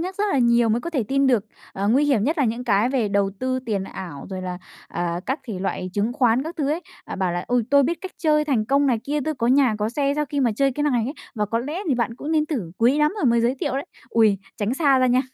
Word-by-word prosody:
nhắc 370 +3 -4
rất 415 - 0
là 275 - +2
nhiều 235 -1 +4
mới 230 +2 +1
có 340 - -5
thể 275 -8 0
tin 275 0 +2
được. 235 -5 +2 0.3
Ờ, 200 +1 -1
nguy 270 +6 +4
hiểm 255 -7 +2
nhất 310 +4 0
là 280 - +3
những 235 +2 -2
cái 220 +1 +2
về 250 -6 0
đầu 200 0 +1
tư 255 0 -1
tiền 200 -4 -1
ảo 175 -7 -8
rồi 185 -1 -5
là, 180 -1 -4 0.3
ờ, 175 0 -2
các 265 +4 -1
thể 205 -5 -5
loại 185 -1 -3
chứng 210 +4 0
khoán 245 0 +2
các 330 +3 -7
thứ 290 -2 0
ấy, 325 +3 -1 0.2
à, - - -6
bảo 185 -2 0
là 175 0 -3
"Ôi, 245 -1 +2
tôi 280 0 +6
biết 330 +5 -1
cách 375 -1 -7
chơi 300 -2 +2
thành 255 -8 +1
công 280 +4 +2
này 240 -4 +2
kia, 295 +1 -1
tôi 310 -1 -1
có 235 -3 -1
nhà 255 -3 +4
có 210 +1 0
xe 280 +3 0
sau 300 0 0
khi 285 +1 -2
mà 245 - +3
chơi 275 -1 +2
cái 295 - -3
này 250 -6 +1
ấy, 275 - -3 0.2
và 210 -1 -1
có 230 +3 -1
lẽ 295 +8 -4
thì 270 - +3
bạn 235 -1 -1
cũng 305 +4 -4
nên 305 -1 +2
thử, 225 - -3
quý 250 +6 +3
lắm 300 +3 +3
tôi 355 - -2
mới 235 -1 +4
giới 240 +3 +2
thiệu - - -1
đấy." 275 - -3 0.2
Ôi, 215 -4 +3 0.2
tránh 215 +4 -1
xa 275 -4 +3
ra 255 - +3
nha. 250 +1 +3
250 Hz, 295 wpm, -23 LUFS, 215-285 Hz, 0.3 s, tôi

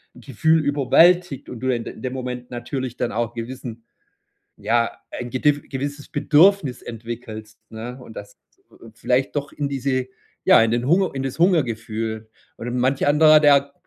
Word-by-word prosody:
'n - - -14
Gefühl 160 +5 +1
überwältigt 150 +2 +3
und 125 - -8
du 130 - -2
in 120 - -4
de - - -8
in - - -14
dem 130 -1 -4
Moment 125 -1 -6
natürlich 125 +1 -5
dann 120 - -2
auch 115 0 -2
gewissen, 115 -1 -7 0.7
ja, 115 -1 +1 0.2
ein 120 -1 -6
gedif 145 +3 +1
gewisses 145 +1 -5
Bedürfnis 155 -1 +3
entwickelst, 115 -1 -8
ne? 120 +3 -8
Und 115 -3 -13
das 100 0 -10 0.6
vielleicht 125 +5 0
doch 145 -1 -3
in 145 -1 -3
diese 130 -1 -1 0.4
ja, - - +6
in 115 - 0
den 120 +2 -1
Hunger 185 +4 +3
in 135 - -2
das 135 +2 -4
Hungergefühl. 115 - 0 0.3
Und 120 +1 -5
manch 130 +2 +1
anderer, 155 +1 +6
der 140 -1 +4
130 Hz, 165 wpm, -22 LUFS, 120-145 Hz, 0.7 s, ja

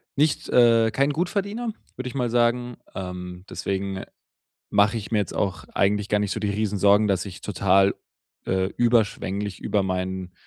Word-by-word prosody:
nicht, 150 +1 +1
äh 115 -2 +5
kein 140 +6 +2
Gutverdiener, 200 +8 -2 0.2
würde 130 0 -4
ich 125 - -7
mal 125 -3 0
sagen. 120 +1 +1 0.2
Ähm, 90 -1 -6
deswegen 95 0 -3 0.7
mache 105 +3 +3
ich 110 -2 -5
mir 110 - +3
jetzt 100 - -2
auch 90 -5 -2
eigentlich 105 +1 +1
gar 105 - +2
nicht 105 -1 -1
so 110 - -3
die 105 -1 0
Riesensorgen, 105 0 +3
dass 95 0 0
ich 90 -4 -9
total, 100 0 +3 0.5
äh, 95 0 +1
überschwänglich 105 -5 +1
über 105 - +1
mein 95 -1 -3
105 Hz, 160 wpm, -24 LUFS, 95-120 Hz, 0.7 s, äh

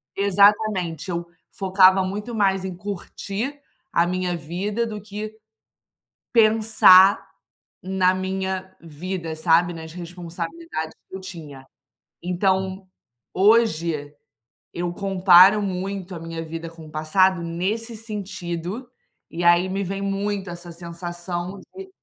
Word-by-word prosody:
Exatamente, 200 -3 +2
eu 170 0 -2 0.2
focava 190 0 +4
muito 210 +5 -4
mais 195 -2 +1
em 185 -1 -5
curtir 205 +7 -5 0.3
a 170 - +3
minha 180 0 -1
vida 195 +8 -3
do 215 -2 -5
que 210 +1 -7 1.0
pensar 215 -4 +6 0.6
na 185 -1 +2
minha 190 0 -3
vida, 165 +1 -5
sabe? 170 +2 +3
Nas 160 -1 -9
responsabilidades 170 -2 -6 0.2
que 190 - -6
eu - - -8
tinha. 150 -8 -10 0.6
Então, 190 +1 0 0.5
hoje, 170 -8 +2 0.6
eu 175 0 -2
comparo 195 +1 +6
muito 190 0 -4
a - - -6
minha 165 0 -6
vida 165 +1 -6
com 165 -1 -13
o - - -13
passado 170 +4 +2
nesse 200 +8 -3
sentido, 200 0 -5 0.4
e 170 +1 -4
aí, 175 +2 +5
me 195 +1 -2
vem 195 +2 -4
muito 200 -1 -2
essa 175 0 -9
sensação 175 +2 -6 0.2
de 385 0 -8
185 Hz, 115 wpm, -23 LUFS, 170-200 Hz, 1.0 s, pensar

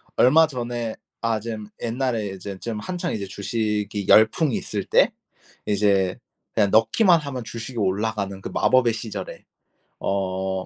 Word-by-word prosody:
얼마 155 +6 +6
전에 120 -4 -4 0.3
아 115 -1 0
좀 110 -1 -6
옛날에 120 -2 -1
이제 95 0 -7
좀 115 -3 -4
한창 180 - -3
이제 100 -2 -3
주식이 105 0 -2
열풍이 110 +6 +5
있을 - - -3
때 - - +4 0.5
이제 100 -3 +2 0.4
그냥 105 -2 +3
넣기만 170 - +5
하면 130 -4 -5
주식이 120 +2 -7
올라가는 100 0 -1
그 - - -6
마법의 125 -3 +3
시절에 105 -4 -6 0.6
어 95 -1 -2
110 Hz, 275 characters per minute, -23 LUFS, 100-120 Hz, 0.6 s, 얼마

